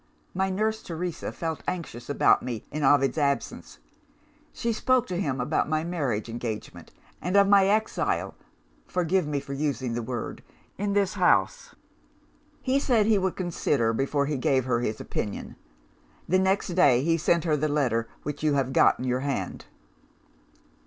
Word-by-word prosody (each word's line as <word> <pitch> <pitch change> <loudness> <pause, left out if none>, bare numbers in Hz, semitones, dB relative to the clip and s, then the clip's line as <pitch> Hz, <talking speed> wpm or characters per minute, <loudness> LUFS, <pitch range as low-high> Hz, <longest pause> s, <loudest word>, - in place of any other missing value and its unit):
My 190 +1 0
nurse 215 +3 -1
Teresa 170 0 -4
felt 160 -1 -4
anxious 145 -9 -5
about 145 - +4
me 120 -4 -5
in 150 - -3
Ovid's 135 +1 +3
absence; 140 -1 -2 0.7
she 235 -1 -2
spoke 255 +2 +2
to 180 -4 -3
him 135 -8 -2
about 125 +3 0
my 155 0 0
marriage 145 -12 -2
engagement, 115 -2 -6 0.3
and 180 +3 +1
of 200 0 +6
my 200 -1 +5
exile 215 +2 0 0.5
forgive 180 -1 0
me 145 -1 -1
for 140 0 -7
using 135 -4 -2
the 120 - -2
word! 120 -1 -5 0.3
in 200 0 -2
this 200 -2 +1
house. - - +1 0.9
He 265 +1 +2
said 240 -7 +2
he 215 -2 +3
would 190 -1 -1
consider, 145 -10 0
before 140 +4 0
he 145 0 -2
gave 130 0 +1
her 120 -2 +1
his 110 -2 -2
opinion. 105 - -5 0.7
The 185 +2 +3
next 190 +1 +1
day, 145 -9 +4
he 165 +2 +2
sent 170 0 +1
her 160 -3 +2
the 150 +1 0
letter 120 -6 0 0.2
which 145 -1 -5
you 150 -2 +2
have 135 -1 0
got - - +5
in 130 - -5
your 125 0 0
hand. 140 0 -3
150 Hz, 165 wpm, -26 LUFS, 130-190 Hz, 0.9 s, of